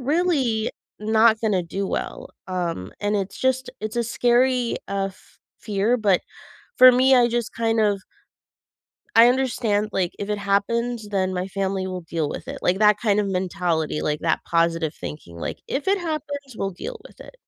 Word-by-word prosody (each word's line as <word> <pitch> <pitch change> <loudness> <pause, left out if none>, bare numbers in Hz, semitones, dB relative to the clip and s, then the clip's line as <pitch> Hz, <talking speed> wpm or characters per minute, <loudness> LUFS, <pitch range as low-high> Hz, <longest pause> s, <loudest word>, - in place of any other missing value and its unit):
really 270 -6 +1 0.3
not 220 +1 +4
gonna 205 -5 +1
do 195 +4 -3
well, - - -4 0.2
um, 170 - -3
and 205 0 0
it's 195 -1 -4
just 260 0 0
it's 215 +2 -4
a 235 - +2
scary, 245 +1 +2
uh, 195 0 -1
f 190 - -23 0.2
fear. 210 +3 +1
But 200 -4 +2 0.6
for 255 0 +10
me, 260 +2 +5
I 245 -1 +5
just 235 -1 -2
kind 225 0 0
of 205 -2 +2 1.2
I 230 +1 +9
understand, 235 -5 +1
like, 180 -2 -1
if 205 - -4
it 210 - -1
happens, 215 +3 0
then 190 -2 0
my 180 +1 -2
family 195 -1 -2
will 185 -1 -5
deal 165 -2 -2
with - - -7
it, 275 +1 -6
like, 180 +2 +2
that 210 -1 +4
kind 210 -3 +2
of 210 - +1
mentality, 180 -5 -1
like, 150 0 -1
that 165 - +1
positive 165 0 +1
that - - -26
thinking, 85 - -8
like, 85 - -5
if 280 +7 -2
it 395 0 +3
happens, 285 -6 -5
we'll 195 - -2
deal 470 - -7
with - - -20
it. - - -12
210 Hz, 180 wpm, -23 LUFS, 190-245 Hz, 1.2 s, for